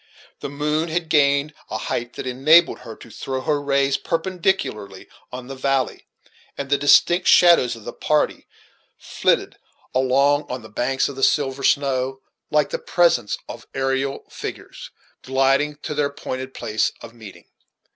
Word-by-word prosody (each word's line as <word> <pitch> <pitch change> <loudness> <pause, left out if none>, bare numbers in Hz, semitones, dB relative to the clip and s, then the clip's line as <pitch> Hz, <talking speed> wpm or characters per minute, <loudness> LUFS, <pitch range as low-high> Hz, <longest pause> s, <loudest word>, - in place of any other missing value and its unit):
The - - -5
moon 150 +3 -1
had 165 0 -2
gained 140 -1 +3 0.2
a - - -3
height 120 +2 -4
that - - -7
enabled 150 +7 +4
her 115 - -10
to 115 - -15
throw 130 +4 -4
her 145 +1 0
rays 140 -1 +1
perpendicularly 165 - -2 0.2
on 125 0 -7
the 135 - -8
valley; 135 -1 -1 0.5
and 140 0 -5
the 140 - +4
distinct 175 +5 +4
shadows 170 -9 +6
of 115 - -13
the 120 - -6
party 150 -1 0 0.5
flitted - - -1 0.4
along 140 +3 +2
on 125 -2 -5
the 110 - -12
banks 130 +5 0
of 140 - -7
the 135 - -7
silver 135 -1 +1
snow, 135 -1 +1 0.3
like 150 -1 +1
the - - -2
presence 165 -11 +1
of - - -10
aerial 135 +1 -1
figures, - - -8 0.3
gliding 135 +3 +1
to - - -4
their 145 -1 +1
appointed 130 -2 -6
place 110 -2 -1
of 115 0 -11
meeting. 110 -5 -13
135 Hz, 155 wpm, -22 LUFS, 130-150 Hz, 0.5 s, shadows